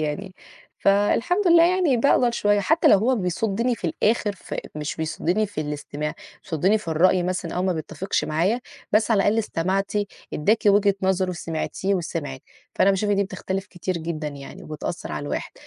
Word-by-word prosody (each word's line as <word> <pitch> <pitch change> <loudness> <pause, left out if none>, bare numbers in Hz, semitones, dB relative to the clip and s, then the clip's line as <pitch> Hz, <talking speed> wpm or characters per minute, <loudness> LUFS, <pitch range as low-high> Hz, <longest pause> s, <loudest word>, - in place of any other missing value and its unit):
يعني، 180 +6 -3 0.4
فالحمد 230 - +2
لله 335 0 +7
يعني 350 -7 +3
باقدر 245 0 +3
شوية، 205 -3 +2
حتى 320 - +3
لو 200 - +7
هو 250 +5 +2
بيصُدّني 220 +5 0
في 205 - -5
الآخر، 210 +5 +1
ف - - -8 0.2
مش 150 -1 -4
بيصُدّني 170 +6 -1
في 190 - -5
الاستماع، 150 +1 -4 0.3
بيصُدّني 185 +7 +1
في 205 - -10
الرأي 175 +3 +3
مثلًا 180 -1 -3
أو 180 - 0
ما 185 - +1
بيتّفقش 180 +4 -2
معايا، 180 +11 0 0.3
بس 215 +2 +3
على 215 - +4
الأقل 210 +2 +2
استمعتِ، 195 -1 -1 0.4
ادّاكِ 210 +9 +2
وجهة 200 0 +5
نظره، 190 -1 +1
سمعتيه 170 +4 -2
وسمعِك، 150 -6 -4 0.3
فأنا 195 - +4
باشوف 205 +2 0
إن 205 - +2
دي 200 - +2
بتختلف 190 0 -4
كتير 180 0 -4
جدًا 160 -2 -4
يعني 140 -1 -10
وبتأثر 155 +3 -5
على - - -4
الواحد. - - -4
190 Hz, 170 wpm, -23 LUFS, 165-210 Hz, 0.4 s, لله